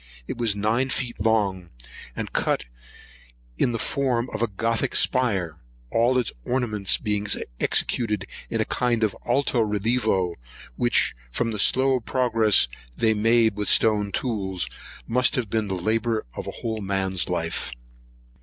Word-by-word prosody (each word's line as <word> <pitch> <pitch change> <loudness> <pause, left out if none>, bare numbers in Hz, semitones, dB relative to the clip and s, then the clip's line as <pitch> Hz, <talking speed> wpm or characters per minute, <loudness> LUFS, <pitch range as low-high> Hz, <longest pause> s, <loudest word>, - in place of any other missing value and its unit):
It - - -4
was 115 -4 +1
nine 110 +6 +1
feet 125 -3 -2
long, 100 -5 +1 0.5
and - - -5
cut - - 0 0.9
in 120 - +3
the 115 - -1
form 125 0 -1
of 110 - -3
a 120 - +2
Gothic 115 +3 0
spire, 95 -11 +2 0.3
all 120 +3 +3
its 125 -4 0
ornaments 105 - 0
being 105 -1 -2 0.3
executed 105 -5 0 0.2
in - - -2
a - - +1
kind 120 -2 0
of 105 -3 +1
alto 120 -1 +2
relievo; 105 -3 0 0.4
which, - - +2 0.2
from 115 - -1
the 105 - -4
slow 130 +4 +3
progress 115 - +3 0.3
they 110 -1 +3
made 110 0 +3
with 105 0 0
stone 105 -2 +4
tools, 95 -7 -2 0.4
must 125 +5 +2
have 120 -6 -2
been 110 -2 0
the 95 - -2
labour 110 +4 0
of - - -6
a 110 -2 -4
man's 95 -4 -1
whole - - -3
life. - - -2
110 Hz, 145 wpm, -24 LUFS, 100-120 Hz, 0.9 s, stone